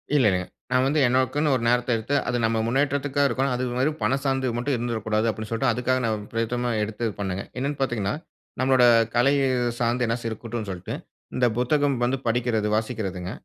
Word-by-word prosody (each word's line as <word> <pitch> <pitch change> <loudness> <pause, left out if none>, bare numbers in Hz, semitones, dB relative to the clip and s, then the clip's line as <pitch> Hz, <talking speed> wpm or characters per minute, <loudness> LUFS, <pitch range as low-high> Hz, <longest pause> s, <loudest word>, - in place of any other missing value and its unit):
இல்லங்க. 105 -10 +4 0.3
நா 125 - +4
வந்து 150 +3 +2
எனக்குனு 130 +4 +1
ஒரு 120 - -2
நேரத்த 120 +1 +2
எடுத்து, 115 +6 -2
அது 125 0 0
நம்ம 110 0 +1
முன்னேற்றத்திற்கா 140 +2 0
இருக்கணும். 135 -1 0
அது 125 - -2
மாரி 135 +4 +2
பண 135 - +2
சார்ந்து 135 -1 0
மட்டும் 130 +3 0
இருந்துடக்கூடாது 110 -2 -1
அப்படினு 110 0 -4
சொல்லிட்டு 120 +2 +1
அதுக்காக 130 +2 0
நா - - +1 0.2
பிரயேத்தமா 120 +2 -1
எடுத்து 110 +2 -3
பண்ணேங்க. 95 -1 -2
என்னனு 140 +2 -2
பாத்தீங்கனா, 110 -6 0 0.5
நம்முடைய 130 -2 +5 0.3
கலை 130 +4 +4 0.5
சார்ந்து 120 +1 +1
என்னாச்சி 115 0 -2
இருக்கட்டுனு 110 -1 -5
சொல்ட்டு, 90 0 -6 0.4
இந்த 125 - +2
புத்தகம் 140 +2 +2
வந்து 125 +2 +1
படிக்கிறது, 115 -2 +1
வாசிக்கிறதுங்க. 100 -5 -3
120 Hz, 165 wpm, -25 LUFS, 110-130 Hz, 0.5 s, நம்முடைய